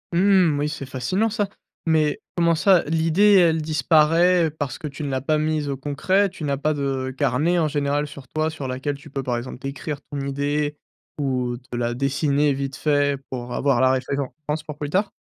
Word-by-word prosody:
Mmh 180 -5 +4
oui, 150 +1 0
c'est 145 -2 -5
fascinant 135 - -1
ça. 205 -2 -1 0.4
Mais 155 -2 +2 0.2
comment 170 -1 +4
ça, 185 +2 +4
l'idée, 165 +6 +3
elle 165 -4 +5
disparaît 160 +2 +3
parce 145 -3 -4
que 155 - -6
tu 140 +2 -8
ne 145 - -2
l'as 130 -1 -1
pas 155 +3 +1
mise 155 -1 -1
au 140 - -1
concret? 185 +9 +1
Tu 180 -3 -10
n'as 140 -2 0
pas 155 +2 0
de 135 -2 -2
carnet 145 +6 +1
en 160 -2 +2
général 145 0 0
sur 140 -2 -11
toi, 155 +4 -1
sur 145 -4 -6
laquelle, 130 +3 -3
tu 140 - -13
peux 135 0 -4
par 125 -2 -1
exemple 125 +2 -6
décrire 145 +2 -5
ton 145 - -3
idée 145 +2 -1 0.4
ou 130 -4 -1
de 125 0 -8
la 120 0 -1
dessiner 140 +2 +1
vite 135 0 -4
fait 145 -2 +1
pour 125 -1 -5
avoir 135 -3 +2
la 130 - +5
référence 140 +3 -3
pour 150 -1 -8
plus 145 -1 -4
tard? 195 +4 +1
145 Hz, 200 wpm, -23 LUFS, 135-160 Hz, 0.4 s, elle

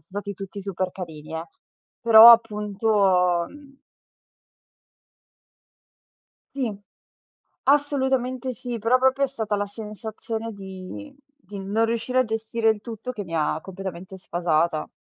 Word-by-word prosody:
stati 200 +1 -6
tutti 195 +1 -8
super 190 -1 -3
carini, 160 -4 -8
eh. 165 - -4 0.6
Però 230 0 +10
appunto, 205 -5 +2
mhmm 280 -2 -16 2.8
Sì. 245 -6 -2 0.9
Assolutamente 265 -3 +1
sì, 240 0 -5
però 230 +4 +3
proprio 265 +2 +3
è - - -1
stata 220 -5 -3
la 205 0 -1
sensazione 220 +2 -6
di 195 +8 -9 0.4
di 200 - -6
non 205 +4 0
riuscire 235 +3 -1
a - - +2
gestire 225 0 -1
il 215 -2 +2
tutto 230 +2 -7
che 210 -5 -5
mi 165 -1 -7
ha 155 0 0
completamente 190 0 -8
sfasata. 170 -3 0
215 Hz, 120 wpm, -24 LUFS, 190-235 Hz, 2.8 s, Però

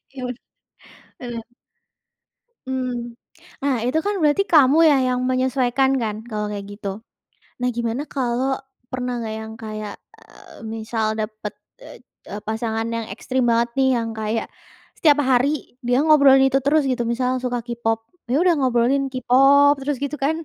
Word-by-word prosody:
Yaudah, 250 -2 -4 0.8
mhm. 240 -2 -6 1.2
Mmm, 250 -2 -3 0.5
nah, 280 -2 +2
itu 310 +6 +1
kan 410 - +1
berarti 300 +6 +3
kamu 290 -1 +6
ya - - +5
yang 250 0 0
menyesuaikan 255 0 +1
kan 215 -2 -2
kalau 210 -2 -2
kayak 200 -1 -5
gitu. 205 -1 -7 0.7
Nah, 250 - +1
gimana 235 +3 -1
kalau 260 0 0 0.4
pernah 250 -1 -3
nggak 220 -2 -4
yang 220 0 -8
kayak, 215 -2 -6 0.2
eee, - - -16
misal 220 0 -2
dapet, 215 -1 -5 0.3
eee, 205 - -11
pasangan 225 0 -2
yang 230 -1 -3
ekstrim 260 -1 -2
banget 235 +1 +2
nih, 265 0 +4
yang 230 -1 -3
kayak 220 +1 -2 0.5
setiap 295 -3 +4
hari 270 +4 +1
dia 245 +1 +3
ngobrolin 280 -4 +6
itu 270 0 +3
terus 295 +3 +3
gitu, 255 -2 0
misalnya 250 +1 -1
suka 245 -1 -1
K-Pop, 230 -2 -1 0.3
ya 255 - +2
udah 355 -1 +4
ngobrolin 260 +1 +1
K-Pop 270 +3 +5
terus 285 +1 -1
gitu 280 +1 -3
kan? 305 +3 +2
250 Hz, 145 wpm, -22 LUFS, 230-270 Hz, 1.2 s, kamu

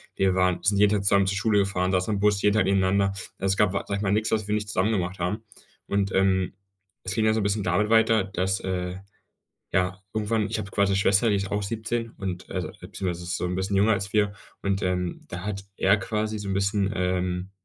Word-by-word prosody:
Wir 95 -1 +2
waren 90 -1 +2
sind 100 +2 +2
jeden 105 +1 +5
Tag 100 -2 0
zusammen 100 -1 +3
zur 100 +1 0
Schule 105 0 +2
gefahren, 95 -2 0
saßen 95 +3 +1
im - - -2
Bus 105 -1 +2
jeden 105 0 +3
Tag 110 - +3
nebeneinander. 95 0 +2 0.2
Es 95 0 0
gab, 105 -3 +3
sage 100 0 -2
ich 100 - -3
mal, 100 -2 0
nichts, 110 +2 +1
was 110 -2 0
wir 105 - +1
nicht 105 -1 -2
zusammen 100 +2 +1
gemacht 95 -2 -2
haben. 95 +6 -2 0.4
Und, 100 -1 0
ähm, 95 -1 +2 0.5
es 95 - -3
ging 110 +1 +1
ja 110 - +4
so 110 - +1
'n - - -1
bisschen 100 +1 0
damit 90 +4 +1
weiter, 110 -1 +4
dass, 95 0 -1
äh, 90 -1 -3 0.8
ja, 90 +1 0
irgendwann 110 0 0
ich - - -2
habe 100 -1 -5
quasi 100 -1 +2
'ne - - +2
Schwester, 100 +3 +3
die 105 - +3
ist 100 -1 -3
auch 105 0 -1
17 115 +3 -3
und, 95 -3 -5
äh, - - -3 0.2
beziehungsweise 90 -2 -4
ist 85 0 -2
so 90 - -2
'n 90 - -2
bisschen 95 +2 -1
jünger 105 +3 +4
als 100 0 -2
wir 105 -1 +2 0.3
und, 100 0 0
ähm, 90 -1 -2
da 90 +1 -6
hat 100 -2 -4
er 95 +2 +4
quasi 110 +1 -2
so 100 -1 -5
'n 95 - -1
bisschen, 100 0 +1
ähm, 90 0 -1
100 Hz, 240 wpm, -26 LUFS, 95-105 Hz, 0.8 s, jeden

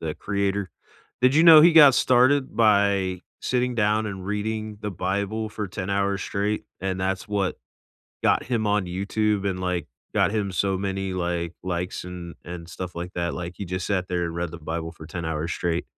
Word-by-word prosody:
the 80 -2 -3
creator? 100 -1 -2 0.5
Did 130 +2 +4
you 160 - +6
know 160 -2 +10
he 170 +2 +7
got 145 -5 +9
started 130 +2 +3
by 100 -4 +3 0.2
sitting 125 0 0
down 110 0 +2
and 95 -3 -6
reading 110 +1 -3
the 105 -1 -3
Bible 100 +4 -2
for 105 -2 -5
10 95 0 -5
hours 100 0 0
straight, 105 +1 -2 0.2
and 95 -1 -2
that's 95 +1 -2
what 100 -3 -1 0.7
got - - +3
him 115 -4 -1
on 105 -2 +1
YouTube 100 +2 -1
and, 90 -1 -3
like, 90 -4 -2 0.3
got - - +3
him 105 -2 -1
so 95 +1 0
many, 95 -1 -2
like, 85 -2 -2
likes 90 0 -3
and 90 -1 -8
and 85 -1 -7
stuff 90 0 -6
like 90 +2 -5
that 85 -1 -2
like 90 0 -5
he 100 - -5
just 90 +1 -3
sat 95 -2 -1
there 90 -1 -1
and 85 - -4
read 85 0 -3
the 85 - -8
Bible 80 +1 -4
for 80 -1 -12
ten 85 +1 -6
hours 80 +1 -2
straight 85 -1 -1
95 Hz, 195 wpm, -24 LUFS, 90-105 Hz, 0.7 s, know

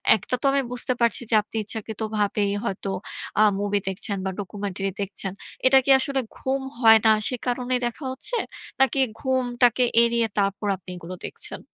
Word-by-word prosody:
একটা 220 +4 -2
তো - - -3
আমি 275 0 +2
বুঝতে 250 +1 -1
পারছি 235 0 +2
যে, 225 - +3
আপনি 210 - -15
ইচ্ছাকৃতভাবেই 215 -1 -2
হয়তো 195 -3 -3 0.5
আ - - +8 0.2
মুভি 205 0 0
দেখছেন 195 +2 -3
বা, - - 0
ডকুমেন্টারি 195 -1 -4
দেখছেন। 195 -1 -4 0.4
এটা 270 - +6
কি - - -1
আসলে 275 0 0 0.2
ঘুম 265 +1 -1 0.2
হয় 225 -2 +8
না 220 - +7 0.2
সে 250 - -2
কারণেই 250 +1 0
দেখা 265 +4 -7
হচ্ছে? 465 - -2 0.4
নাকি 270 +1 +3 0.2
ঘুমটাকে 250 -2 +2 0.2
এড়িয়ে 235 -1 +2
তারপর 200 +1 0
আপনি 185 0 -15
এগুলো 175 +1 -8
দেখছেন? - - -7
225 Hz, 165 wpm, -24 LUFS, 200-255 Hz, 0.5 s, আ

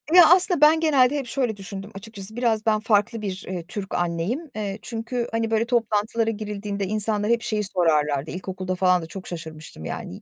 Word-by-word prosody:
Ya, 355 -2 +10
aslında 360 -3 +3
ben 310 +2 +7
genelde 285 -4 +4
hep 275 -3 -4
şöyle 240 -5 -1
düşündüm 195 +1 -8
açıkçası, 200 0 -9
biraz 230 -3 0
ben 215 -1 +3
farklı 215 +1 +1
bir, 195 -2 -4
eee, 180 -2 -4
Türk 195 0 -6
anneyim. 175 - -2
Eee, 205 -1 -3
çünkü, 235 +1 -3
hani, 225 0 -1
böyle 225 +1 +2
toplantılara 225 -1 +1
girildiğinde 205 -2 -4
insanlar 210 +1 0
hep 235 -1 +2
şeyi 215 -1 -1
sorarlardı, 155 -6 +1
ilkokulda 185 0 -4
falan 180 -1 +3
da - - -6
çok 185 +3 -9
şaşırmıştım, 155 - -8
yani, - - -5
"Y - - -10
210 Hz, 190 wpm, -24 LUFS, 185-230 Hz, -, Ya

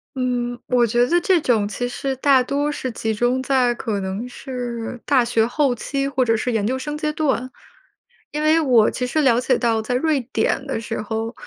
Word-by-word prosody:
嗯， 245 -1 -2
我 245 -1 +3
觉 240 +2 +2
得 345 +1 +3
这 370 0 +3
种 235 -8 +1
其 215 +4 -3
实 270 +2 -3
大 265 -1 +4
多 285 +3 -1
是 265 -3 -4
集 225 -1 -2
中 245 +4 +1
在 260 -2 +2
可 220 -4 -3
能 190 +5 -4
是 245 -2 -6
大 265 -3 +4
学 230 -2 +2
后 275 +1 +1
期 275 +3 -3
或 265 -2 0
者 225 -1 +2
是 235 +3 -1
研 215 -3 0
究 260 +3 -1
生 295 +3 -5
阶 305 0 -1
段。 265 -5 -1 0.8
因 300 - -2
为 310 +1 +4
我 245 -8 +4
其 250 - -3
实 310 +5 0
了 245 -4 +4
解 255 0 +2
到 230 -2 +1
在 220 +3 -3
瑞 295 +2 +1
典 270 - 0
的 270 - -3
时 225 0 -4
候， 225 +1 -3
250 Hz, 225 characters per minute, -21 LUFS, 235-275 Hz, 0.8 s, 大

